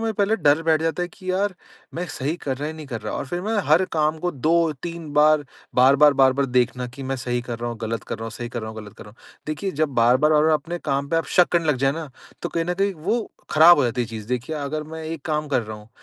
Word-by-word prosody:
मुझे 225 -1 -1
पहले 205 +1 +1
डर 145 -4 +3
बैठ 160 -1 +2
जाता 165 +2 -1
है 175 - -3
कि 185 +2 -7
यार 195 +1 0 0.4
मैं 175 +2 -3
सही 145 +3 -3
कर 135 -2 -1
रहा 145 +2 -4
या 160 - -6
नहीं 155 -2 -9
कर 120 -4 -5
रहा। - - -5
और - - -4
फ़िर 175 +6 -3
मैं 220 +2 -2
हर 165 +5 +5
काम 155 0 +1
को 180 +2 -1
2-3 165 +1 -1
बार, 150 0 +4 0.3
बार-बार, 140 +3 +6
बार-बार 135 0 +3
देखना 125 0 0
कि 130 +3 -10
मैं 135 0 -3
सही 125 -1 -2
कर 120 -1 -6
रहा 120 0 -3
हूँ, 115 - -7
गलत 115 0 -4
कर - - -5
रहा 115 - -6
हूँ 115 - -5
सही 120 +1 -6
कर 120 -1 -5
रहा 110 - -5
हूँ, 110 - -11
गलत 105 -1 -12
कर - - -10
रहा 105 - -12
हूँ। 115 - -23 0.3
देखिए, 155 +6 -3
जब 155 -1 0
बार-बार, 125 +6 +4
बार-बार 155 +1 +4
अपने 170 +4 -3
काम 140 +1 -1
पे 165 - 0
आप 165 - 0
शक 180 - +6
करने 170 -2 +2
लग 150 - +2
जाए 135 +1 +2
ना, 155 -3 -6 0.3
तो - - -2
कहीं 165 -1 -1
न 180 +1 -1
कहीं 195 +1 0
वो 215 +9 -2 0.2
ख़राब 165 +3 +8
हो - - +4
जाती 120 +1 -1
है 120 - 0
चीज़। 110 -2 -7
देखिए, 125 +5 -2
अगर 150 +1 -3
मैं 160 +1 -8
एक 160 -1 -5
काम 150 -1 -2
कर 130 -4 +1
रहा 110 0 -7
हूँ 105 0 -15
150 Hz, 285 wpm, -23 LUFS, 125-165 Hz, 0.4 s, ख़राब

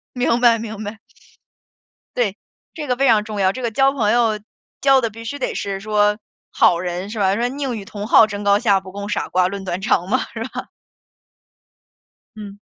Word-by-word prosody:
明 245 -1 +1
白， 235 -2 +5
明 220 -1 -6
白。 215 +1 -7 1.2
对， 220 -5 0 0.4
这 305 -3 -5
个 250 -1 0
非 275 +1 +2
常 215 -3 +4
重 210 -2 -5
要。 190 0 +3
这 255 - -7
个 235 - -1
交 270 +4 +3
朋 220 -7 +1
友 225 -3 +2 0.4
交 270 -1 +5
的 230 -3 -1
必 230 +2 -11
须 285 +5 -5
得 265 - -2
是 195 -1 -3
说 210 0 +1 0.3
好 170 - +4
人 180 +1 -4
是 220 - -6
吧？ 195 -1 +2
说： 240 +1 0
“宁 270 -2 -3
与 200 - -7
同 205 0 -7
好 225 - +7
争 205 -1 -6
高 200 0 +4
下， 205 -4 +3
不 185 0 -12
共 200 0 -6
傻 - - -2
瓜 180 0 +2
论 200 0 -6
短 185 0 -3
长” 185 -4 +1
嘛， - - +3 0.2
是 - - -4
吧？ - - -7 1.7
嗯。 205 -1 -9
215 Hz, 215 characters per minute, -20 LUFS, 200-240 Hz, 1.7 s, 好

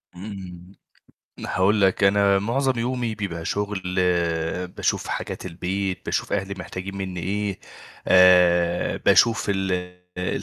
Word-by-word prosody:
إمم، 95 -1 -9 0.6
هاقول 100 +3 +1
لك، 95 +1 +2
أنا 100 0 +4
معظم 130 +4 0
يومي 120 -2 -2
بيبقى 85 -6 -5
شغل، 105 -1 -2 0.9
باشوف - - -2
حاجات - - -5
البيت، 95 +2 -3
باشوف - - -2
أهلي 100 0 -2
محتاجين 95 +1 -7
مِنّي 95 -2 -4
إيه، 100 +2 -2 0.5
آآ، 90 -1 +4
باشوف 115 -3 +3
ال 95 -1 0 0.5
ال 90 - -2
95 Hz, 115 wpm, -23 LUFS, 90-105 Hz, 0.9 s, أنا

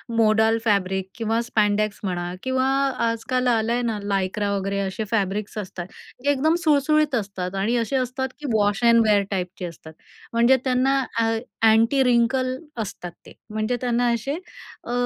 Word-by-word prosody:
Modal 220 0 +3
fabric 190 -3 0
किंवा 225 0 0
स्पॅडॅक्स 215 -2 0
म्हणा 175 -2 -3
किंवा 260 0 0 0.4
आजकाल 240 +3 -1
आलंय 235 0 +1
ना 230 -3 -1
लायक्रा 200 +1 -1
वगैरे 200 0 -2
असे 195 +2 -2
फॅब्रिक्स 205 -1 -1
असतात. 185 -4 -5 0.4
ते 285 - +1
एकदम 310 +4 +2
सुळसुळीत 305 -2 +3
असतात 195 -4 -3
आणि 205 +5 0
असे 235 +3 -1
असतात, 255 +1 -1
की 300 - -8
वॉश 205 +1 +1
एंड 235 0 +6
वेअर 205 -1 +4
टाईपचे 180 -1 -3
असतात. 160 -1 -10 0.4
म्हणजे 235 +3 +5
त्यांना 265 +1 +2 0.2
अ, 230 - +3 0.5
अँटी 230 +5 +4
रिंकल 255 +1 +2 0.3
असतात 180 -4 -6
ते. - - -13 0.2
म्हणजे 215 +3 -1
त्यांना 245 0 +1
असे 255 +5 -2 0.5
अ, - - -6
225 Hz, 150 wpm, -23 LUFS, 200-250 Hz, 0.5 s, एंड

